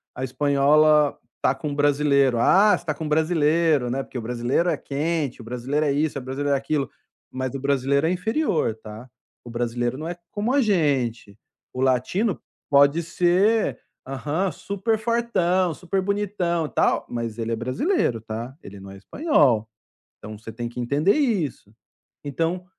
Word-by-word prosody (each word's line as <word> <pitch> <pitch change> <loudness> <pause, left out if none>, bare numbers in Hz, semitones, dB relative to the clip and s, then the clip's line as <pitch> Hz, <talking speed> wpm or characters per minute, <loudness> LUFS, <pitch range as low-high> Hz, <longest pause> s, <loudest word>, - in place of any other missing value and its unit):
a 130 - -5
espanhola 145 +2 +3 0.2
tá - - +2
com 150 -3 -4
brasileiro, 140 -3 +2
ah, 195 - +5
você - - -14
está 155 - -1
com 155 +1 -5
brasileiro, 155 -3 +2
né, 135 +2 -2
porque 130 - -9
o - - -3
brasileiro 125 +8 0
é - - 0
quente, 145 -3 -2
o - - -10
brasileiro 125 +6 -2
é 140 - +2
isso, 145 0 0
o - - -9
brasileiro 140 +2 -2
é - - +3
aquilo, 135 0 -1 0.4
mas 130 0 -4
o - - -3
brasileiro 140 +1 +1
é 165 - +2
inferior 185 - 0
tá, 110 +3 -11 0.3
o 120 - -11
brasileiro 120 +1 -2
não 155 +3 -5
é 175 - -4
como 215 +5 -2
a 285 - +4
gente, 135 - 0 0.4
o 130 - -4
latino 145 - +1 0.3
pode 140 +3 +5
ser, 180 +6 +2 0.3
aham, 150 +8 -2
super 210 +3 -2
fortão, 190 -7 +1
super 185 +4 -2
bonitão 190 -4 -1
e 150 - -6
tal, - - +1
mas 115 -1 -4
ele 115 0 -2
é - - +1
brasileiro 130 - 0
tá, 115 +4 -6
ele 100 0 -11
não 95 0 -10
é 95 - -11
espanhol, 130 - +2 0.5
então, 105 0 -9
você 115 +1 -9
tem 120 +1 -5
que 120 +1 -8
entender 145 +10 +2
isso. 195 - -1 0.5
Então, 165 +5 -2
145 Hz, 170 wpm, -23 LUFS, 125-175 Hz, 0.5 s, ah